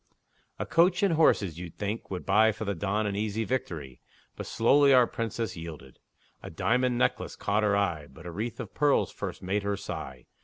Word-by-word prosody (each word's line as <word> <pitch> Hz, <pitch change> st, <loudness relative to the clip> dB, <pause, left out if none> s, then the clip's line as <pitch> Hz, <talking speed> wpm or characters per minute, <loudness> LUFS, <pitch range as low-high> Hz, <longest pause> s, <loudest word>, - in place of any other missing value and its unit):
A -, -, -3 dB
coach 175 Hz, +3 st, +3 dB
and 195 Hz, -4 st, +3 dB
horses, 100 Hz, -, +3 dB
you'd 85 Hz, -2 st, -8 dB
think, 105 Hz, +2 st, -4 dB
would 95 Hz, -2 st, -5 dB
buy 110 Hz, +1 st, +5 dB
For 110 Hz, +1 st, -6 dB
the 100 Hz, -, -1 dB
Don 100 Hz, +4 st, -1 dB
an 100 Hz, -1 st, -2 dB
easy 110 Hz, +1 st, -1 dB
victory; 80 Hz, -, -4 dB, 0.3 s
But -, -, -7 dB
slowly 140 Hz, +4 st, +5 dB
our 125 Hz, -1 st, +6 dB
Princess 115 Hz, -3 st, -3 dB
yielded. 80 Hz, -6 st, -9 dB, 0.4 s
A -, -, -8 dB
diamond 125 Hz, +1 st, +1 dB
necklace -, -, 0 dB
caught 105 Hz, +1 st, 0 dB
her 105 Hz, -1 st, +2 dB
eye, 85 Hz, -7 st, -1 dB
But 80 Hz, -, -14 dB
a 85 Hz, -, -5 dB
wreath 110 Hz, +6 st, -4 dB
of -, -, -7 dB
pearls 145 Hz, -2 st, +2 dB
first -, -, -6 dB
made 100 Hz, +3 st, 0 dB
her 100 Hz, 0 st, -2 dB
sigh. 65 Hz, -8 st, -7 dB
105 Hz, 195 wpm, -28 LUFS, 90-120 Hz, 0.4 s, our